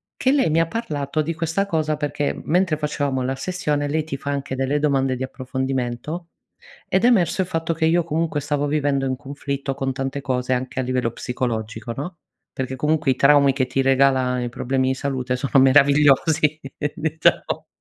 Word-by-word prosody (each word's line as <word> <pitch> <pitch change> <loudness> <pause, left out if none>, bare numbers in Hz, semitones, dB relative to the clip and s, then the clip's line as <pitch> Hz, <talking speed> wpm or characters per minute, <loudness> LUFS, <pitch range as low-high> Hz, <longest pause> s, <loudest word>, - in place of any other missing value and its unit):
che 260 - +2
lei 270 - +3
mi 160 - +3
ha 165 - +2
parlato 155 -9 -2
di 165 +2 -2
questa 165 +4 -1
cosa 155 -5 -1
perché 145 -1 -2
mentre 175 -1 +2
facevamo 145 -3 -1
la 130 +1 -1
sessione 150 -2 -2
lei 155 +2 0
ti 150 -2 -5
fa 140 - -6
anche 140 -1 -3
delle 135 +2 0
domande 135 -3 +1
di 130 - -4
approfondimento, 130 +4 -3 0.6
ed 190 +4 +1
è - - +7
emerso 190 -7 +3
il - - -3
fatto 165 -1 -1
che 160 0 0
io 170 +1 +3
comunque 160 -1 -1
stavo 145 0 -1
vivendo 145 -2 0
in 130 -1 -1
conflitto 140 0 -4
con 135 0 -2
tante 135 +1 -3
cose 130 -2 -2
anche 130 +1 -1
a - - 0
livello 125 -2 -1
psicologico, 115 -2 -4
no, 170 +5 -6 0.3
perché 130 0 -4
comunque 150 +1 +1
i - - -5
traumi 140 0 +5
che 130 -1 0
ti 130 +1 -1
regala 130 -1 +3
i 120 - -3
problemi 130 +2 -1
di 130 - +1
salute 130 -2 -2
sono 135 0 +3
meravigliosi 145 +3 +4 0.4
diciamo. 160 0 0
140 Hz, 185 wpm, -22 LUFS, 130-155 Hz, 0.6 s, è